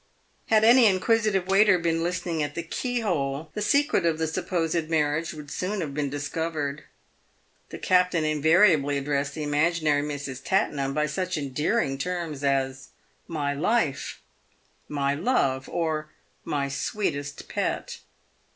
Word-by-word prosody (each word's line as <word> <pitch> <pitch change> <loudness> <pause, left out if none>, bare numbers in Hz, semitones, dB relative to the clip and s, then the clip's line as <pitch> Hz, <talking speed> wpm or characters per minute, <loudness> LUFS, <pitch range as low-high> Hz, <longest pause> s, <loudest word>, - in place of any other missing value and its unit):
Had 220 -1 +4
any 235 +1 +7
inquisitive 205 0 +2
waiter 195 0 +5
been 165 -1 0
listening 175 -1 -2
at 145 0 -3
the 170 - -3
keyhole, 165 - -2
the 210 - -4
secret 285 - +2
of 165 -2 +1
the 160 - 0
supposed 165 -1 -1
marriage 155 0 +1
would 150 -2 -10
soon 200 +3 -2
have 150 -6 -3
been 145 -1 -1
discovered. 145 0 -3 0.8
The - - -7
captain 180 -3 +2
invariably 155 -1 +4
addressed 140 0 -1
the 155 - -4
imaginary 150 0 +2
Mrs. 145 -2 -5
Tattenham 140 -8 0
by 150 0 +2
such 185 +3 -2
endearing 140 - -1
terms 170 -4 -3
as 135 -1 0 0.4
"my 145 -4 -2
life," 160 - -1 0.7
"my 140 -1 0
love," 140 - 0
or 155 -2 -2 0.2
" - - -40
my 140 -1 0
sweetest 145 -1 -3
pet." - - -3
155 Hz, 135 wpm, -26 LUFS, 145-180 Hz, 0.8 s, any